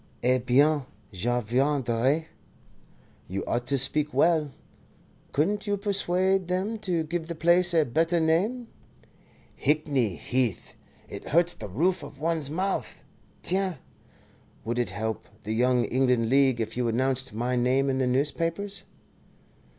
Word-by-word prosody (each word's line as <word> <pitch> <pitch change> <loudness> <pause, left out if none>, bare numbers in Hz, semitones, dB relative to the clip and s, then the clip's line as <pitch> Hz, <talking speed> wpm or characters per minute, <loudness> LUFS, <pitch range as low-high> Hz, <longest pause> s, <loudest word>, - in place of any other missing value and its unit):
"Eh 130 +1 +3
bien, 140 +5 +3 0.3
je 120 +6 0
viendrai. 130 +3 +1 1.0
You 95 +2 -4
ought 120 +1 -2
to 140 - +1
speak 150 +3 +1
well. 160 -3 +3 0.8
Couldn't 205 +9 0
you 205 0 +1
persuade 190 -2 +1
them 190 +5 -2
to 180 -6 -1
give 165 +1 -4
the 170 - -5
place 175 +2 +4
a 160 -3 +3
better 165 +7 +1
name? 195 +10 +1 0.9
Hickney 140 - +1
Heath! 125 -3 -1 0.3
It - - -9
hurts 170 +2 +3
the 105 - -8
roof 175 - +1
of 140 - -11
one's 160 -2 -1
mouth. 185 +5 -3 0.4
Tiens 185 -2 0 0.9
would 120 +2 -1
it 120 - 0
help 110 +3 -4 0.2
the 110 - -3
Young 125 +1 +2
England 125 -2 +1
League 135 -2 +3
if 110 0 -3
you 125 -1 0
announced 130 +2 0
my 120 +4 -1
name 130 +3 +2
in 135 -1 0
the 130 - +1
newspapers?" 165 +9 -1
140 Hz, 135 wpm, -27 LUFS, 125-170 Hz, 1.0 s, place